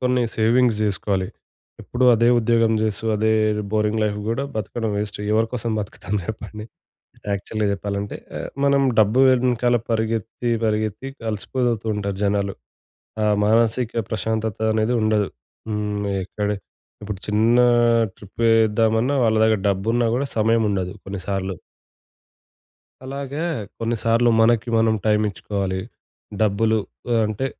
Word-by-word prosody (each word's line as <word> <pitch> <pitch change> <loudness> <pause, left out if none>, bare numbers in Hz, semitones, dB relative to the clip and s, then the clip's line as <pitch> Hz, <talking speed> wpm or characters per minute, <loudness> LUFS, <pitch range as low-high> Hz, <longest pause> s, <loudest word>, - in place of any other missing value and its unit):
కొన్ని 125 -1 +1
సేవింగ్స్ 115 0 +3
జేసుకోవాలి. 100 -2 0 0.5
ఎప్పుడూ 125 +1 -1
అదే 115 +1 +3
ఉద్యోగం 115 -1 +2
జేస్తూ 110 0 -2
అదే 110 +1 +1 0.4
బోరింగ్ 105 0 +1
లైఫ్ 105 -1 0
గూడా 115 +4 -1
బతకడం 110 +2 -3
వేస్ట్. 105 0 -3
ఎవరి 110 +1 +3
కోసం 115 -2 -2
బతుకుతాం 100 0 -5
జెప్పండి. 105 +1 -7 0.7
యాక్చువల్‌గా 105 +2 -2
చెప్పాలంటే 100 0 -4 0.2
ఆహ్, - - -5 0.2
మనం 140 0 +3 0.2
డబ్బు 110 +4 +4
వెనకాల 125 -1 +2
పరిగెత్తి, 115 +1 -1
పరిగెత్తి 110 +1 -1
ఇంక 135 - -30
అలిసిపోతుంటారు 110 -3 -2
జనాలు. 100 -1 0 0.7
ఆ - - +2 0.2
మానసిక 115 +2 +2 0.2
ప్రశాంతత 110 0 -2
అనేది 110 +2 +1
ఉండదు. 110 -2 +1 0.4
హ్మ్. 105 -1 -2 0.2
ఎక్కడ 105 +2 -3 0.5
ఇప్పుడు 105 -2 -5
చిన్న 110 +3 +3 0.6
ట్రిప్ 100 +3 -10
యేద్దామన్నా 115 +3 +3
వాళ్ళ 110 -1 +3
దగ్గర 110 -1 +3
డబ్బున్నా 115 +5 +1
గూడా 135 +3 0
సమయముండదు 105 -4 +1
కొన్నిసార్లు. 95 -1 -4 1.5
అలాగే 140 +2 -5 0.4
కొన్నిసార్లు 115 +1 +1
మనకి 115 -1 +3
మనం 110 0 +3
టైమిచ్చుకోవాలి. 100 -2 0 0.6
డబ్బులు 110 +2 +2 0.4
ఆహ్, 115 -1 +3
అంటే 110 +5 -2
110 Hz, 115 wpm, -22 LUFS, 105-115 Hz, 1.5 s, డబ్బు